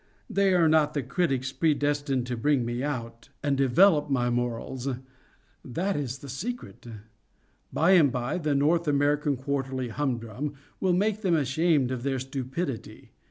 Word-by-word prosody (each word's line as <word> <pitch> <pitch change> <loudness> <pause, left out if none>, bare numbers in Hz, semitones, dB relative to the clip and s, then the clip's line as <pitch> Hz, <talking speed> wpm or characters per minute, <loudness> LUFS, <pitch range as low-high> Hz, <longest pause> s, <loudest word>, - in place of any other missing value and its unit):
They 195 -1 +2
are 170 -2 +4
not 155 -1 +3
the 145 - 0
critics 135 -2 -1
predestined 145 -4 0
to 125 0 -3
bring 130 +1 +1
me 120 +1 -3
out, 115 -3 -5
and 145 -1 +1
develop 150 +4 +4
my 120 -3 +1
morals:—that 130 +7 -4
is 135 -3 -3
the 140 - -11
secret. 135 - -6 0.8
By 165 +4 +3
and 160 -8 +6
by 125 +7 -2
the 150 -3 0
"North 160 +4 +2
American 145 0 +2
Quarterly 130 -1 -2
Humdrum" 125 +2 -3 0.2
will 185 -2 +2
make 210 +3 +1
them 185 -5 +2
ashamed 145 -1 +2
of 130 -2 -3
their 135 +1 -1
stupidity. 130 +1 -5
140 Hz, 145 wpm, -27 LUFS, 125-155 Hz, 0.8 s, and